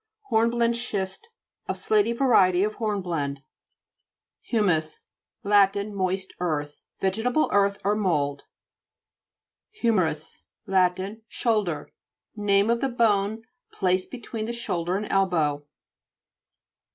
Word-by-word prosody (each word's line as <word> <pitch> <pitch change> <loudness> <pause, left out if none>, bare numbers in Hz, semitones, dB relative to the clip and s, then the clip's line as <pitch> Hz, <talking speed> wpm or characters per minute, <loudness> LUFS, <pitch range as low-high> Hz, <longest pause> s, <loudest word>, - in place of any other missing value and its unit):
HORNBLENDE 235 +1 +2
SCHIST 205 - -4 0.4
A - - 0
slaty 420 - +2
varie 235 -7 +4
ty - - 0
of 215 - -2
hornblende. 175 -10 -2 1.1
HU'MTJS 175 -9 +1 0.4
Lat. 200 -1 +4
Moist 190 -1 -2
earth. 150 -4 -3
Vege 190 +3 0
table 250 +5 +2
earth 200 0 +3
or 205 +1 +2
mould. 145 -9 0 1.3
HI/MERITS 165 -9 0 0.3
Lat. 185 -3 +2 0.3
Shoulder. 210 -12 -1 0.4
Name 205 +1 +2
of 235 - 0
the 270 - +1
bone 220 -2 +1 0.3
placed 185 0 0
between 230 -3 -6
the 235 - -3
shoulder 180 -6 -2
and 210 - -3
elbow. 160 -7 +1
200 Hz, 105 wpm, -25 LUFS, 180-225 Hz, 1.3 s, varie